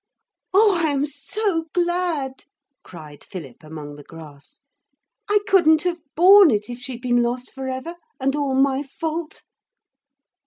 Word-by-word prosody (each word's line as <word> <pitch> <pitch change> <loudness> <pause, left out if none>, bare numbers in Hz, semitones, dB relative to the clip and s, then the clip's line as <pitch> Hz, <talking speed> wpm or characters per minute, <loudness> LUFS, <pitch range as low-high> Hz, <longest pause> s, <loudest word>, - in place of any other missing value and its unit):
'Oh, 395 -2 +4
I 315 - +2
am 285 0 0
so 325 +5 -3
glad,' 345 -6 -1 0.4
cried 155 -4 -12
Philip 145 -10 -9
among 155 -2 -9
the 145 - -12
grass. 155 - -14 0.7
'I 415 0 +3
couldn't 320 -5 +4
have 350 -2 -2
borne 380 +2 +8
it 210 0 -1
if 240 - -7
she'd 250 -1 -7
been 245 -1 +2
lost 245 +1 -3
for 265 -1 -6
ever, 260 +6 -5 0.3
and 270 +1 0
all 285 -3 -1
my 270 0 +2
fault.' 320 +3 -5
275 Hz, 145 wpm, -22 LUFS, 240-340 Hz, 0.7 s, borne